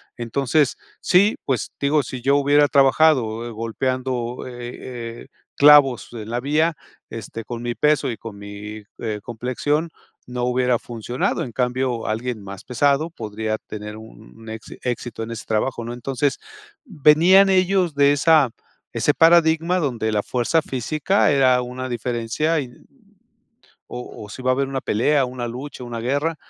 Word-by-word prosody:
Entonces, 135 +5 0 0.2
sí, 200 +4 +4
pues, 130 -3 -2
digo, 145 +1 +2
si 125 0 -7
yo 140 +3 +3
hubiera 145 +1 +4
trabajado 130 -5 +3
golpeando, 125 +2 -3
eh 120 -1 -8
eh, - - -21 0.3
clavos 145 -3 +6
en 110 -1 -7
la 120 - -1
vía, 155 +5 +1 0.4
este, 115 0 -7
con 120 -1 -6
mi 120 0 -3
peso 150 -2 +2
y 115 - -4
con 105 -3 -9
mi, 105 +1 -8 0.2
eh, 110 -2 -4
complexión, 130 +8 -2 0.3
no 125 0 -3
hubiera 125 -1 +1
funcionado, 120 +1 -3
en 120 - -7
cambio, 125 0 -1
alguien 115 +1 -3
más 100 -1 -9
pesado 140 +6 +1
podría 110 -4 -4
tener 105 0 -7
un, 110 - -13
exi 110 0 -9
éxito 120 -2 -4
en 110 - -5
ese 115 -2 -7
trabajo, 115 +2 -1
¿no? 120 - -5
Entonces 135 +3 -2 0.5
venían 185 - +5
ellos 185 -3 +2
de 140 0 +4
esa 145 -2 +4 0.4
ese 120 +5 +2
paradigma 165 +1 +4
donde 120 -9 -1
la 105 -1 0
fuerza 130 +6 0
física 155 - 0
era 130 -2 +4
una 125 +1 -5
diferencia, 120 +6 -1
y, 130 -4 -5 1.2
o 125 -3 -8
o - - -16
si 130 - -8
iba 130 - +1
a - - +2
haber 135 +1 -1
una 135 -1 -3
pelea, 135 +6 +2
una 125 -1 -5
lucha, 130 +3 -7
una 120 -1 -5
guerra, 145 +7 -1
125 Hz, 155 wpm, -22 LUFS, 115-145 Hz, 1.2 s, clavos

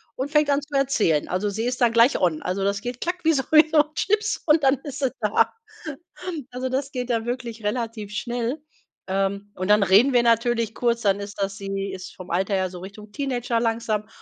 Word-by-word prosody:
und 265 +2 -3
fängt 300 -1 +3
an 280 0 +2
zu 290 0 -8
erzählen. 215 - +1
Also, 190 +3 -1
sie 220 +3 -3
ist 250 0 -2
dann 235 -2 +3
gleich 235 +3 +5
on. 170 -4 +1
Also, 195 +2 -2
das 200 0 0
geht 245 +1 -5
klack 360 +1 -2
wie 325 - +4
so 270 -3 +1
wie 310 0 +7
so 315 - +2
'n 300 +1 +2
Schnips 425 +1 0
und 310 0 +4
dann 265 +1 +5
ist 285 -2 -6
sie 265 -3 0
da. 210 -1 +2 1.0
Also, 255 +1 -3
das 270 +2 -2
geht 250 -2 -4
dann 230 -1 0
wirklich 240 -2 -5
relativ 220 -1 -3
schnell. 240 +6 -3 0.5
Ähm, 195 +1 -1
und 185 +2 -4
dann 210 -1 +5
reden 200 +8 +5
wir 240 - +5
natürlich 230 -1 +1
kurz, 235 -1 +1
dann 200 -1 +2
ist 200 0 -7
das 195 0 -1
sie 195 0 -4
ist 185 -1 -8
vom 185 -1 -11
Alter 190 +3 0
her 185 -1 0
so 180 -1 -9
Richtung 205 +2 -11
Teenager 245 -4 -1
langsam. 225 -2 -1
230 Hz, 220 wpm, -24 LUFS, 200-260 Hz, 1.0 s, wie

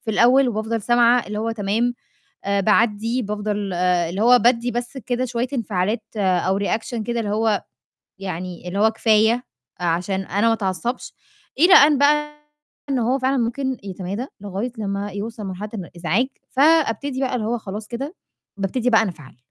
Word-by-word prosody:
في 220 - -2
الأول 250 +5 +4
وبافضل 220 0 -2
سامعة 240 +1 +4
اللي 210 0 -4
هو 225 +1 -1
تمام، 225 +3 0 0.5
آآ 200 0 +1
باعدّي، 220 +3 +2
بافضل 210 -2 -3
آآ 175 -1 +1
اللي 190 +4 -3
هو 245 +2 +6
بادّي 240 +1 +2
بس 240 +3 -4
كده 250 0 -2
شوية 245 0 -2
انفعالات 215 -1 -1
أو 190 0 +1
reaction 225 +4 -2
كده 235 +1 -2
اللي 215 -3 -2
هو 215 -1 +1 0.6
يعني 180 -2 -6
اللي 195 +3 -3
هو 220 +1 +4
كفاية، 220 +2 +2 0.4
عشان 180 +3 0
أنا 200 +3 0
ما - - +4
أتعصّبش 225 +3 -3 0.5
إلى 350 +5 +7
أن 290 -4 +7
بقى 300 +1 +2 0.5
إن 265 - +1
هو 245 +3 +1
فعلًا 265 +1 +1
ممكن 260 +2 -1
يتمادى 195 +5 -5
لغاية 205 +4 -4
لمّا 200 -1 -3
يوصل 210 +2 -6
مرحلة 190 +3 -5
الإزعاج، 180 +4 -1 0.2
فأبتدي 280 -3 +2
بقى 260 -2 -1
اللي 225 -4 -1
هو 240 +2 -1
خلاص 210 0 -7
كده، 275 +8 -5 0.4
بابتدي 225 +6 -1
بقى 225 -1 +5
أنفعل 165 -10 -7
220 Hz, 165 wpm, -22 LUFS, 200-245 Hz, 0.6 s, إلى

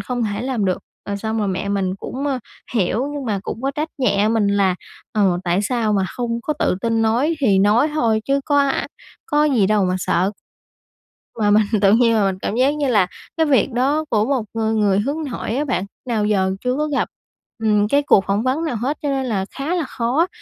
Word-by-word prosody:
không 245 -1 -3
thể 205 +2 -3
làm 250 -6 -1
được. 185 -1 0 0.3
Rồi 200 - -2
xong 220 +2 -3
rồi 205 -2 0
mẹ 190 +1 -2
mình 190 -2 0
cũng, 270 +7 -5
a, 270 -3 0 0.4
hiểu, 225 +6 +1
nhưng 280 -2 -4
mà 210 -4 -1
cũng 230 - -6
có 275 - 0
trách 300 +3 -3
nhẹ 210 -5 +2
mình 220 -2 +2
là 200 -2 +2 0.4
"Ờ, 195 -4 +2
tại 180 +3 +1
sao 225 -1 0
mà 195 -2 +2
không 235 -1 -2
có 305 - -1
tự - - +1
tin 225 -1 +1
nói, 245 +9 +2
thì 200 -7 +3
nói 215 +9 +4
thôi 225 -7 +2
chứ 275 0 +1
có 290 -1 +2
a 280 -1 +1 0.4
có 300 -7 +2
gì 245 -10 +3
đâu 210 -2 +2
mà 185 0 0
sợ." 185 +2 +1 1.1
Mà 205 -1 +3
mình 215 +1 +5 0.2
tự 195 0 +5
nhiên 230 0 +4
là 210 - +3
mình 190 -1 -1
cảm 215 - -2
giác 260 +3 +3
như 290 -2 -1
là 205 -7 +3 0.3
cái 320 - +3
việc 275 -2 +2
đó 280 +6 +1
của 215 -1 +2
một 260 -3 0
người 225 -1 0
người 205 -2 +2
hướng 285 +8 -2
nội 230 - -3
á 295 +2 0
bạn 200 -8 -1 0.2
nào 215 -3 +1
giờ 190 -3 +1
chưa 250 0 0
có 305 0 0
gặp, 290 - 0 0.6
ừm, 210 -1 +3
cái 285 +5 +3
cuộc 195 -8 +4
phỏng 200 +3 +1
vấn 270 +6 0
nào 295 - -2
hết, 260 +7 -2
cho 290 - -1
nên 270 -1 -1
là 200 -6 -1
khá 290 +6 -2
là 345 - 0
khó. 260 +10 0
225 Hz, 230 wpm, -20 LUFS, 205-275 Hz, 1.1 s, mình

